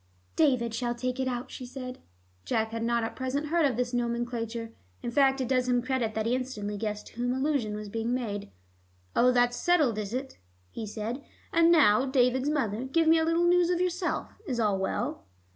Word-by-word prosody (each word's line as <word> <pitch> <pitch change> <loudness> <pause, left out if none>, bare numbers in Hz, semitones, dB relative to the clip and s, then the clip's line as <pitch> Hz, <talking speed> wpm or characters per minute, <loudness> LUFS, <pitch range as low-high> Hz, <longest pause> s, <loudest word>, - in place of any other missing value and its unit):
"David 255 -7 +2
shall 240 +1 -1
take 255 +1 -3
it 260 - 0
out," 245 -1 -3
she - - -7
said. 255 0 -7 0.4
Jack 220 - 0
had 230 0 -3
not 235 0 +1
at 225 - -4
present 275 +3 -2
heard 330 -2 +3
of 250 -4 -2
this 245 0 -1
nomenclature. 235 -1 -2 0.3
In 240 - -2
fact, 270 +1 +3
it 255 - -1
does 255 -1 +1
him 245 -1 +2
credit 250 -4 -1
that 220 0 -1
he 235 - +1
instantly 250 -5 -3
guessed 210 0 -3
to - - -14
whom 245 +1 0
allusion 265 -6 0
was 210 0 -6
being 225 +3 -2
made. 220 - -3 0.7
"Oh, 250 +1 +5
that's 245 0 +2
settled, 300 -11 +2
is 205 -1 -4
it?" 260 +2 -5 0.3
he 220 - -5
said. 225 +6 -4 0.3
"And 335 0 +5
now, 270 -6 +5
David's 260 +1 +2
mother, 250 -6 -1
give 325 +5 +2
me 325 0 +6
a - - +2
little 330 +1 +2
news 350 0 +4
of 355 -1 +1
yourself. 360 0 -1 0.2
Is 250 -5 -2
all 205 -4 +2
well?" 145 - -2
245 Hz, 205 wpm, -28 LUFS, 230-270 Hz, 0.7 s, me